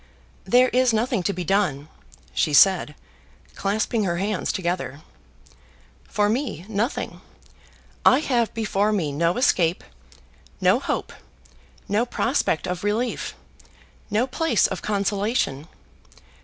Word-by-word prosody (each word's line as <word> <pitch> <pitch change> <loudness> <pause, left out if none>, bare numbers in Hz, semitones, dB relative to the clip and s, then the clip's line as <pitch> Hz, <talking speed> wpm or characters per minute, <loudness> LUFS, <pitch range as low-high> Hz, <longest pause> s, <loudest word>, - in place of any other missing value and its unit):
"There 250 +1 +4
is 250 -1 +2
nothing 230 0 0
to 190 - 0
be 180 -2 -4
done," 170 -6 0 0.5
she 150 - +1
said, 185 -4 +5 0.6
clasping 215 +2 -1
her 175 -3 -1
hands 200 +1 -1
together. 175 -5 -3 1.1
"For 205 0 +1
me 220 - -2
nothing. 220 +5 -3 0.8
I 260 - +5
have 240 -7 +1
before 210 -2 0
me 175 -9 0
no 170 +6 0
escape, 175 -10 +2 0.8
no - - +4
hope, - - -3 0.7
no 215 +5 +1
prospect 240 - 0
of 180 0 -4
relief, 220 +4 -2 0.7
no 215 +3 +1
place 265 -2 +1
of 190 - -2
consolation. 200 - -1
205 Hz, 115 wpm, -23 LUFS, 180-235 Hz, 1.1 s, said